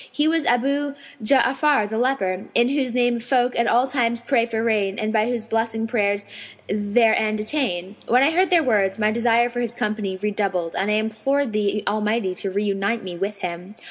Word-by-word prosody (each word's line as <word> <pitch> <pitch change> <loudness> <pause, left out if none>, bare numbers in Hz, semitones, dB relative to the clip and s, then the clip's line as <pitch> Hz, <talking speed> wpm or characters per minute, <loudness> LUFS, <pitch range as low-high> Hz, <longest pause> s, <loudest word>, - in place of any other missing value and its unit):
He 295 +1 +1
was 325 -1 +1
Abu 280 +4 +1 0.3
Ja'afar 270 0 +3
the 220 +1 -3
leper, 195 -8 -1
in 240 +1 +4
whose 270 -3 0
name 245 -1 +1
folk 245 +1 0
at 235 - +1
all 245 +2 +3
times 240 -3 0
pray 235 -3 +2
for 225 -1 -2
rain 205 -4 0
and 215 0 -2
by 215 0 +2
whose 235 -3 -3
blessing 225 0 -1
prayers 205 -3 0 0.4
their 215 +2 +2
end 215 0 0
attain.' 210 -6 -2
When 250 +3 +4
I 295 - +3
heard 365 +3 +2
their 340 -3 +4
words, 200 -7 +1
my 215 -1 +1
desire 235 +1 +2
for 245 0 -5
his 235 -1 -2
company 210 -4 -2
redoubled 195 -4 -2
and 195 - 0
I 210 - +2
implored 220 +4 -1
the 210 0 0
Almighty 210 -1 0
to 195 - -3
reunite 200 +3 -1
me 180 -2 -6
with 200 +3 -4
him. 180 +3 -6
225 Hz, 195 wpm, -22 LUFS, 205-245 Hz, 0.4 s, in